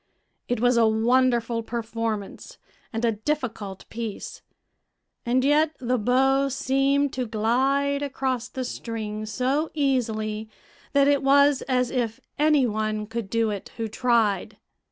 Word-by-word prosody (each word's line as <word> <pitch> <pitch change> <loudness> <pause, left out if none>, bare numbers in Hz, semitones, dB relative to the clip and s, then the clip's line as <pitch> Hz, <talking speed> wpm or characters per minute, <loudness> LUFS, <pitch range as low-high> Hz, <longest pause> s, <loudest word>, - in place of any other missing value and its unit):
It 245 - -1
was 245 +1 +3
a 230 -1 +5
wonderful 235 +1 +2
performance 230 - -4 0.3
and 225 +1 -1
a 230 - +3
difficult 220 -5 -4
piece, 225 -2 -6 0.9
and 255 +2 +2
yet 300 +2 +3
the 250 0 -1
bow 270 +4 +3
seemed 275 +1 +1
to 255 -2 -2
glide 265 +6 +1
across 260 -3 -2
the 260 -1 -4
strings 215 -3 -5
so 270 +6 0
easily 220 -6 -1 0.4
that 280 0 +4
it 285 -1 +3
was 280 0 +4
as 250 -1 +1
if 235 -4 -2 0.2
any 300 -3 +4
one 215 -1 -1
could 225 -2 -5
do 225 0 +1
it 200 -2 -6
who 225 -1 -2
tried. 225 -3 +1
245 Hz, 135 wpm, -25 LUFS, 220-270 Hz, 0.9 s, a